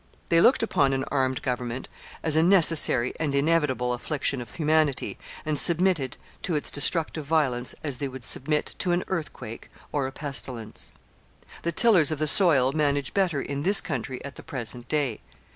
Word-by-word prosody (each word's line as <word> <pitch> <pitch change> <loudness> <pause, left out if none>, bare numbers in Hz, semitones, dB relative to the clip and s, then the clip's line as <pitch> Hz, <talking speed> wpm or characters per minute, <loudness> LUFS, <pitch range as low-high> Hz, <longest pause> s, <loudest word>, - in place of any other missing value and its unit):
They 165 0 +4
looked 250 +3 +4
upon 140 -11 +1
an 135 0 -1
armed 130 -2 0
government 125 0 -4 0.4
as 155 -2 +1
a 160 - +4
necessary 165 -8 +5
and 150 -3 -2
inevitable 140 -5 +1
affliction 135 +1 -2
of 120 - -11
humanity, 155 -3 0 0.3
and 150 -2 0
submitted 170 -6 +3 0.2
to 170 - -2
its 150 - -1
destructive 155 +1 +1
violence 140 -5 -1
as 140 -5 -4
they 140 - -2
would 130 -2 -7
submit 150 +3 0
to 180 - +1
an 175 - 0
earthquake 155 -10 -6 0.2
or 140 -3 -1
a - - -7
pestilence. 120 - -5 0.7
The 170 - -2
tillers 180 -5 +3
of 155 - -2
the 155 - -1
soil 145 -6 +5
manage 145 -2 -1
better 180 -8 0
in 140 0 -5
this 195 +6 +5
country 130 - -5
at 140 - -9
the - - -9
present 120 -2 -7
day. 145 -7 -1
145 Hz, 170 wpm, -25 LUFS, 130-160 Hz, 0.7 s, necessary